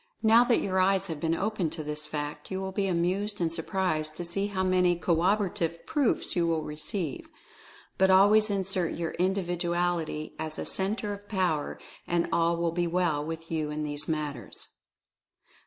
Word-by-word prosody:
Now 225 +2 +7
that 240 -1 +2
your 190 -1 0
eyes 190 +1 +3
have 160 -2 -4
been 165 +1 +1
opened 195 -4 -1
to 155 - -4
this 150 0 -4
fact, 150 -1 -5
you 190 - -3
will 190 0 -3
be 195 +1 0
amused 185 +4 0
and 165 -2 0
surprised 160 -3 -1
to 175 - -3
see 195 +4 -1
hoW 190 -2 -1
many 180 -1 +3
corroborative 170 -1 0
proofs 290 -6 +1
you 170 -2 +2
will 165 -2 0
receive. 150 +1 -4 0.7
But 190 0 +5
always 205 +3 +6
assert 190 -3 -1
your 165 -1 -2
Individuality 175 -4 -1
as 155 0 -4
a - - -3
Centre 205 +2 -1
of 205 0 -10
Power, 180 -7 0 0.3
and 170 0 +1
all 170 0 +2
will 170 0 0
be 175 +1 0
well 170 -4 +1
with 165 +1 -6
you 155 -2 -1
in 150 0 -3
these 145 0 -2
matters. 150 -4 -4
175 Hz, 170 wpm, -28 LUFS, 160-190 Hz, 0.7 s, Now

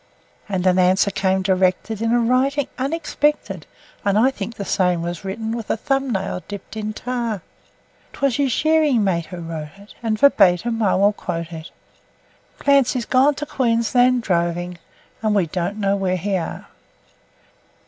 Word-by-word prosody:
And 190 -2 -1
an 185 0 +4
answer 185 +2 +3
came 190 0 0
directed 190 +3 +1
in 230 0 +1
a 240 - +4
writing 255 +4 +1
unexpected, 295 +1 -1 0.4
(And 200 0 +2
I 250 +5 +4
think 230 -2 -6
the 200 - -5
same 180 -3 +1
was 175 0 -5
written 220 +3 -4
with 230 -3 -6
a - - +1
thumb 270 +2 -1
nail 190 -3 -2
dipped 205 +1 -8
in 215 0 -3
tar) 235 -3 -3 0.7
'Twas 275 -4 0
his 280 -2 +1
shearing 305 -4 +3
mate 170 -5 0
who 180 - -8
wrote 160 -2 -6
it, 200 +1 -15
and 225 -2 -1
verbatim 225 -3 +4
I 200 -3 +3
will 200 +2 +3
quote 170 -4 -5
it: 160 0 -8 0.9
'Clancy's 275 -4 +2
gone 270 +5 +3
to 295 - -4
Queensland 245 -1 +2
droving, 175 -1 -1 0.4
and 215 -1 +1
we 195 -4 +3
don't 180 +5 -3
know 200 -1 +1
where 185 -2 0
he 195 +3 -1
are.' 170 -3 -4
210 Hz, 160 wpm, -21 LUFS, 185-250 Hz, 0.9 s, an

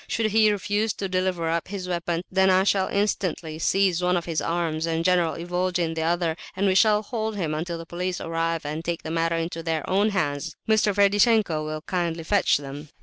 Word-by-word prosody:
Should 220 -1 0
he 215 0 +5
refuse 205 +1 0
to 195 - -4
deliver 185 -2 -1
up 165 +1 -1
his 190 -2 -5
weapon, 170 -1 -2
then 190 0 +3
I 185 0 +4
shall 195 -1 +2
instantly 180 -6 -1
seize 185 0 +2
one 180 0 +2
of 170 - -3
his 165 -2 -1
arms 165 -1 -1
and 165 0 -1
General 180 -3 +2
Ivolgin 175 -1 -1
the 160 - -3
other, 165 0 0 0.2
and 195 +2 0
we 190 - +3
shall 210 +2 +4
hold 220 0 -3
him 165 -6 -2
until 170 +2 -3
the 165 - -8
police 180 +1 -3
arrive 165 -1 -2
and 155 +2 -4
take 170 -1 -3
the 160 - -5
matter 165 0 0
into 165 0 -3
their 160 -2 -2
own 200 +3 +2
hands. 145 -8 -2
Mr. 215 -1 +3
Ferdishenko 205 -4 +3
will 155 0 -4
kindly 170 -2 -2
fetch 200 +4 +3
them." 145 +1 -8
175 Hz, 205 wpm, -25 LUFS, 165-195 Hz, 0.2 s, he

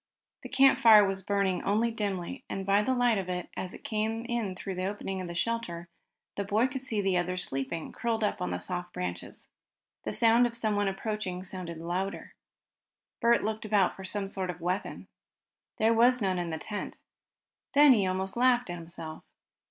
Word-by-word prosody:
The - - -9
campfire 255 -6 +7
was 195 0 -2
burning 195 -1 0
only 220 +4 +1
dimly, 200 -6 -3
and 195 - -4
by 200 +1 +4
the 260 +5 0
light 245 -4 +3
of 185 -1 -5
it, 180 -1 -3
as 185 - -4
it - - -13
came 220 +1 -2
in 230 -6 -2
through 190 +1 -5
the 185 0 -3
opening 195 -1 -3
of 180 - -5
the 170 - -6
shelter, 175 -4 -2 0.5
the 200 - 0
boy 210 +5 +2
could 265 0 -5
see 225 -5 -1
the 195 -2 +1
others 180 +1 -1
sleeping, 135 +5 -4
curled 230 -2 -1
up 210 - -1
on 90 - -1
the 90 - -2
soft 175 - -5
branches. 90 -1 -5 0.5
The - - -3
sound 235 +1 +5
of 235 - -7
someone 210 -3 0
approaching 195 -2 -3
sounded 180 -3 -6
louder. 180 +4 -4 0.9
Bert 235 0 +3
looked 220 0 -2
about 205 -3 +2
for 190 - -10
some 195 +1 -2
sort 190 -2 -4
of 175 -1 -5
weapon. 180 +3 -3 0.7
There 225 +1 +3
was 245 +2 +5
none 190 -4 0
in 175 -1 -3
the 160 - -3
tent. 205 +5 -6 0.8
Then 290 -1 +8
he 200 -5 +2
almost 190 +1 -2
laughed 245 -4 +3
at 175 - -5
himself. 165 -1 -9
195 Hz, 190 wpm, -29 LUFS, 180-225 Hz, 0.9 s, Then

